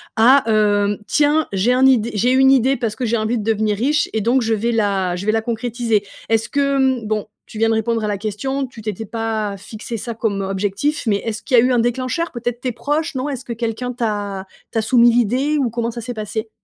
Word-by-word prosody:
à 255 +5 +6
hem: 205 -2 +2
«Tiens, 295 +7 +2
j'ai 200 +6 +2
un 255 +1 +4
id 240 -4 +4
j'ai 235 +4 +2
une 265 +1 +5
idée 265 0 +3
parce 230 -3 -2
que 245 +2 -3
j'ai 230 +1 +1
envie 220 +2 0
de 210 - -3
devenir 215 -1 0
riche 285 +7 +1
et 220 - 0
donc 240 +5 +2
je 225 -1 0
vais 225 +2 0
la 200 -5 0
je 180 +2 -5
vais 215 - +3
la 225 - +1
concrétiser»? 230 -1 -1 0.3
Est-ce 225 0 +1
que, 280 -1 +1
hem, 260 -4 +1
bon, 215 -1 -2 0.2
tu - - -11
viens 225 +1 +2
répondre 225 +1 0
à - - 0
la 205 -1 -1
question. 265 +7 -3
Tu 240 -3 -12
t'étais 215 +1 -4
pas 220 -2 -3
fixé 220 +4 -7
ça 235 +2 -5
comme 215 -3 -2
objectif, 200 +9 -1
mais 205 -2 +2
est-ce 215 0 -5
qu'il 255 - +2
y - - +9
a - - +5
eu 255 - +2
un 245 - +3
déclencheur? 255 +8 -1
Peut-être 240 0 -4
tes 255 - -1
proches, 295 +7 -2
non? 260 +2 -2
Est-ce 265 -3 -4
que 245 - -8
quelqu'un 230 +2 -3
t'a 205 -5 -3 0.3
t'a 225 - 0
soumis 240 +1 +5
l'idée, 250 +6 +1
ou 265 -4 +1
comment 235 0 -2
ça 235 - -7
s'est 245 +2 -5
passé? 220 0 -5
230 Hz, 240 wpm, -19 LUFS, 215-250 Hz, 0.3 s, y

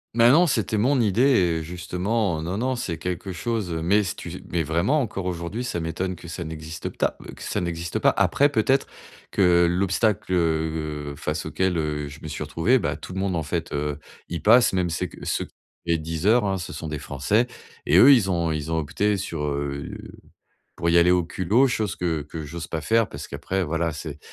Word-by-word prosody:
Mais 115 0 +6
non, 165 +8 +6
c'était 110 - 0
mon 130 +5 +3
idée 110 +1 +2
et 90 -12 +3
justement, 90 +1 -2
non, 90 +5 -3
non, 130 +2 0
c'est 85 -9 -4
quelque 90 +1 -4
chose 105 0 -2
mais 85 +6 +2
si 95 -1 -3
tu - - -8
mais 85 - +1
vraiment, 85 - +1
encore 100 -6 -4
aujourd'hui, 90 +6 -3
ça 115 -8 -3
m'étonne 85 +3 -3
que 85 - -12
ça 85 +1 -5
n'existe 80 +1 -6
ta - - +1 0.2
que - - -14
ça - - -2
n'existe 85 -1 -3
pas. - - +3
Après, 145 +1 +3
peut-être, 135 +1 +2 0.5
que 90 -3 +4
l'obstacle, 95 +3 +1
heu 80 -3 -1
heu, - - -10
face - - -3
auquel, 95 -2 0
heu, 75 -1 -2
je 70 - -11
me - - -7
suis 75 0 -4
retrouvé, 80 - +2
bah, - - -1
tout - - -9
le 95 - -3
monde, 95 -2 0
en 80 - 0
fait, 80 +2 -3
heu, 75 0 -2 0.3
y 85 - -3
passe, 120 +4 +5
même 90 -2 0
c'est 80 - -1
que - - -11
ceux - - -1 0.4
les 85 -1 +2
Deezer, 80 +9 +1
hein, 95 -1 0
ce 85 - -6
sont 80 - -6
des 75 -2 -4
Français 75 - 0 0.4
et - - +5
eux, 140 +2 +9
ils 110 -7 +3
ont 85 -3 +1
ils 75 0 -3
ont 80 - +1
opté 100 +7 0
sur 85 -5 -4
heu, 70 -1 -3 0.9
pour 85 - 0
y 85 - +5
aller 85 +1 +5
au 90 -1 +3
culot, 100 +10 +2
chose 110 -4 -1
que 85 -3 -1
que 75 +2 -7
j'ose 85 +3 -6
pas 80 -2 -4
faire, 115 +7 +2
parce 70 +1 -8
qu'après, 95 0 -2
voilà, 85 +1 -1
c'est 75 -1 -7
85 Hz, 210 wpm, -24 LUFS, 80-105 Hz, 0.9 s, eux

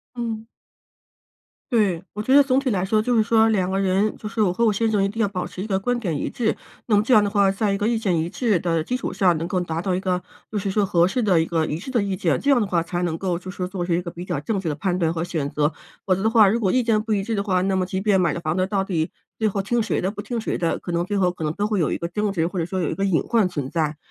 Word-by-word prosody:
嗯。 225 -2 -4 1.3
对， 200 -7 +2
我 210 - -4
觉 260 +5 +2
得 285 - +9
总 265 -1 +2
体 275 -1 0
来 190 -4 0
说 215 +3 +2
就 245 +3 0
是 220 - +5
说 225 0 +4
两 190 -4 +1
个 190 - 0
人， 195 +2 +1
就 210 - -6
是 220 0 -1
我 185 -4 +2
和 230 +6 +1
我 215 - +4
先 225 +2 0
生 205 -2 +2
一 - - +1
定 225 +3 -2
要 205 - +2
保 185 -2 -4
持 180 +2 -7
一 215 - -5
个 190 -2 +1
观 245 +6 -1
点 170 -9 -2
一 - - -2
致， 225 -3 -1 0.3
那 215 - +3
么 205 - +4
这 250 - +4
样 215 - +7
的 205 - 0
话， 200 -1 +3
在 205 +1 0
一 195 - -1
个 210 - 0
意 235 - +2
见 195 -7 0
一 160 +1 -1
致 210 0 +1
的 165 -1 0
基 245 +10 -2
础 260 - -4
上， 180 -4 +2
能 165 - -3
够 180 +1 -1
达 165 -2 -3
到 185 +1 -1
一 180 - -1
个 185 -1 0 0.3
就 215 - -2
是 200 - -2
说 205 +1 +1
合 175 -3 +3
适 215 +7 -1
的 190 -6 +3
一 160 - 0
个 165 -1 0
一 155 - -3
致 195 - -10
的 235 -5 +2
意 195 -1 -2
见， 185 - 0
这 285 - +1
样 265 -3 +5
的 210 - +1
话 175 -3 +1
才 175 +1 -3
能 165 -2 -1
够 180 0 -2
做 185 +1 -8
出 180 -1 -4
一 175 - 0
个 175 - -6
比 175 +1 -8
较 145 - -3
正 200 +8 -2
确 185 -3 -3
的 150 - -1
判 185 +2 -1
断 165 -2 +1
和 160 - -2
选 160 -5 -2
择。 150 +1 0 0.3
否 185 -2 +2
则 195 - -3
的 - - +4
话， 220 -3 +6
如 225 - +2
果 195 -5 +1
意 255 - +3
见 225 -2 +2
不 220 0 -3
一 200 - +1
致 220 +2 -2
的 200 - 0
话， 185 -3 +1
那 195 0 +1
么 185 -1 0
即 190 +1 -3
便 195 -1 +3
买 170 -4 +2
了 - - -4
房 155 0 -2
子， 185 0 +1
到 195 0 0
底 170 -5 -2 0.3
最 220 -1 +2
后 200 -1 -2
听 240 +5 0
谁 225 - 0
的、 190 - -1
不 205 - -7
听 235 +2 -3
谁 - - -2
的， 165 -1 0
可 - - -7
能 170 0 0
最 205 - -2
后 180 -2 +3
可 175 -2 -6
能 150 - 0
都 205 +5 -1
会 210 -2 0
有 160 -5 +1
一 - - 0
个 170 - -3
争 205 +3 -1
执， 170 -3 0
或 185 - -5
者 165 - 0
说 185 +1 -3
有 160 - 0
一 - - -4
个 195 - -1
隐 190 -5 +2
患 220 -6 +2
存 145 -6 -4
在， 155 -3 -1
195 Hz, 360 characters per minute, -23 LUFS, 175-215 Hz, 1.3 s, 得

